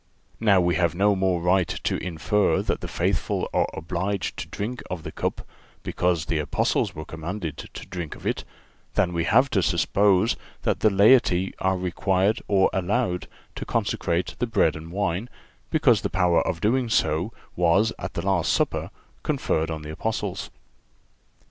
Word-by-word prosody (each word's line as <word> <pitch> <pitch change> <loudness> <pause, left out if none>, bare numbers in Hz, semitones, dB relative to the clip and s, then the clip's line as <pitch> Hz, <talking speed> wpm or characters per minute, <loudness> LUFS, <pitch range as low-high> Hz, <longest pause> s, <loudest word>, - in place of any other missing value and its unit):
Now 105 -4 +4
we 90 -1 +2
have 85 -2 +1
no 100 +2 +3
more 95 -2 +1
right 90 0 +3
to - - -2
infer 90 +4 +1
that - - -2
the - - -4
faithful - - -1
are - - +2
obliged 90 +4 -3
to - - -5
drink 120 +5 -4
of 90 -3 -5
the - - -6
cup, - - -3 0.4
because 90 -3 0
the 80 - -1
Apostles 75 -1 0
were 80 - -6
commanded 80 0 -5 0.2
to - - -8
drink 85 -4 -6
of - - -14
it, - - -1 0.5
than 90 -4 +2
we 85 -1 0
have 130 +4 +4
to 95 - +2
suppose 95 +5 +3 0.3
that - - +1
the 110 - +4
laity 100 -3 +4
are 95 0 +1
required 95 +3 +1
or 95 -2 +3
allowed 95 0 0 0.3
to - - -6
consecrate 85 +1 -1
the 125 - 0
bread 80 -8 +2
and 80 +1 -9
wine, 100 +3 -1 0.4
because 125 -10 +3
the - - -1
power 90 -2 +3
of 85 -3 -2
doing 120 +3 +1
so 90 -1 +1 0.2
was 90 +6 +3
at 85 0 -6
the 85 - -3
last 95 -4 +2
Supper - - 0 0.3
conferred 80 +1 0
on 80 -1 -4
the 75 - -6
Apostles. 105 +1 -3
95 Hz, 165 wpm, -25 LUFS, 85-105 Hz, 0.5 s, Now